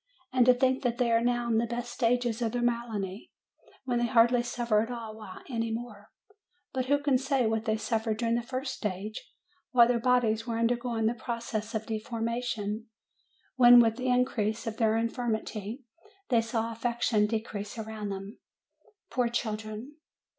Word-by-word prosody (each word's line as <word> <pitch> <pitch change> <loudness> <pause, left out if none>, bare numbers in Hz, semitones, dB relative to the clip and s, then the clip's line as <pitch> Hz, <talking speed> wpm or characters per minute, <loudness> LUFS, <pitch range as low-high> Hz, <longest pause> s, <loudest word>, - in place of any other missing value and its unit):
And 255 -1 +4
to 250 - +9
think 260 +1 +2
that 245 -3 0
they 240 -2 +2
are 230 0 +4
now 240 0 +1
in 225 -1 +2
the 235 - 0
best 240 +1 -4
stage 245 0 +1
of 230 -1 -1
their 245 0 -1
malady, 225 -5 -2 0.5
when 245 -2 0
they 240 - +1
hardly 235 +1 +4
suffer 240 -3 +1
at 225 - -3
all 225 -3 -7 0.2
any 230 -3 -2
more! 225 -3 -6 0.6
But 260 -1 -1
who 285 +2 +4
can 285 -3 +2
say 270 -2 +1
what 220 0 0
they 220 0 +1
suffered 220 0 -1
during 230 0 0
the 235 - +1
first 255 +2 -4
stage, 210 0 -4 0.5
while 240 -2 +7
their 240 -1 +2
bodies 230 -2 +2
were 230 -1 -1
undergoing 235 -1 0
the 225 - +2
process 230 -1 -4
of 220 0 -2
deformation, 225 -1 -3 0.7
when 245 -1 +9
with 225 -1 +4
the 255 0 -3
increase 235 -3 +1
of 225 -1 -4
their 220 -1 +2
infirmity, 230 0 -3 0.5
they 235 -3 +4
saw 225 0 -2
affection 230 -2 +1
decrease 210 -1 -4
around 220 -2 -5
them, 195 +2 -7 0.7
poor 250 -2 +1
children! 220 +3 -4
230 Hz, 170 wpm, -29 LUFS, 220-245 Hz, 0.7 s, to